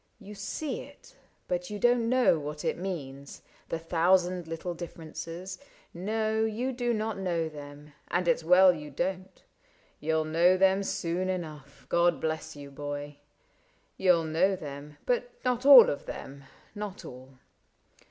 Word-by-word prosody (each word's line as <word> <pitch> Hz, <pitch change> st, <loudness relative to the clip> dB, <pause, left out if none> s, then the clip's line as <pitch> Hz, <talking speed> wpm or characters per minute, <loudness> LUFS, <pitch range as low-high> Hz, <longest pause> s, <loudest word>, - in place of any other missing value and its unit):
You 205 Hz, -, -10 dB
see 235 Hz, +8 st, -4 dB
it, -, -, -15 dB, 0.3 s
but 180 Hz, 0 st, -2 dB
you 210 Hz, -, -4 dB
don't 240 Hz, +1 st, +3 dB
know 250 Hz, -10 st, +4 dB
what 150 Hz, +1 st, -6 dB
it -, -, +1 dB
means: 140 Hz, -7 st, -6 dB, 0.3 s
The -, -, -1 dB
thousand 175 Hz, +1 st, +2 dB
little 165 Hz, +2 st, -4 dB
differences 170 Hz, +2 st, -7 dB, 0.2 s
— -, -, -34 dB
no. 220 Hz, +4 st, -1 dB
You 225 Hz, +4 st, -1 dB
do 240 Hz, -1 st, -1 dB
not 215 Hz, -2 st, -2 dB
know 170 Hz, -4 st, -1 dB
them, 145 Hz, -1 st, -11 dB
and 175 Hz, 0 st, -1 dB
it 165 Hz, -, +4 dB
'S -, -, -11 dB
well 180 Hz, +2 st, +7 dB
you 150 Hz, -3 st, -8 dB
don't; 185 Hz, +5 st, -4 dB, 0.6 s
You'll 160 Hz, +1 st, 0 dB
know 170 Hz, +4 st, +4 dB
them 190 Hz, +1 st, +4 dB
soon 185 Hz, -1 st, -2 dB
enough 150 Hz, -7 st, -6 dB
— -, -, -40 dB
God 170 Hz, -1 st, +3 dB
bless 160 Hz, 0 st, -3 dB
you, 140 Hz, -1 st, -10 dB
boy! 145 Hz, +1 st, -6 dB, 0.4 s
— -, -, -38 dB
You'll 180 Hz, -3 st, +4 dB
know 165 Hz, +5 st, +2 dB
them, 145 Hz, -2 st, -9 dB
but 245 Hz, 0 st, 0 dB, 0.2 s
not 250 Hz, +1 st, +1 dB
all 270 Hz, -4 st, +11 dB
of 140 Hz, -, -3 dB
them 140 Hz, 0 st, -8 dB
— -, -, -28 dB
not 205 Hz, -1 st, -6 dB
all. 130 Hz, +1 st, -12 dB
175 Hz, 160 wpm, -29 LUFS, 150-195 Hz, 0.6 s, all